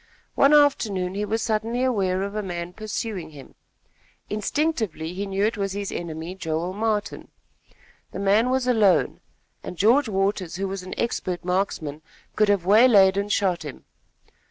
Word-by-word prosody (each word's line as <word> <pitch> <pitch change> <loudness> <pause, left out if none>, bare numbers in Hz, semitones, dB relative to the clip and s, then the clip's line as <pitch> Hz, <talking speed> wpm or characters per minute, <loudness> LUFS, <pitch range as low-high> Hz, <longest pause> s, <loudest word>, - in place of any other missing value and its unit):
One 275 - +4
afternoon 220 -11 +3
he 205 +2 -2
was 220 +1 -1
suddenly 225 +2 -1
aware 195 -7 0
of 200 0 -4
a 215 - -2
man 175 -2 -5
pursuing 215 -3 -5
him. 145 -3 -13 0.8
Instinctively, 210 - -2
he 200 +2 -4
knew 195 +1 0
it 220 0 -1
was 195 -1 -2
his 200 0 -4
enemy 165 +1 -5
Joel 170 -1 -3
Martin. 215 0 -2 0.8
The - - -7
man 200 +5 +2
was 260 0 +1
alone, 220 -6 +3 0.4
and 180 - -8
George 235 +7 +3
Waters, 195 -3 -1
who 195 +2 -2
was 195 0 -5
an 185 0 -8
expert 185 -6 -2
marksman, 180 -5 -2 0.3
could 215 -1 +3
have 200 -4 +2
waylaid 205 -2 +6
and 200 +1 -2
shot 185 -4 +1
him. 145 -3 -9
200 Hz, 155 wpm, -24 LUFS, 180-220 Hz, 0.8 s, waylaid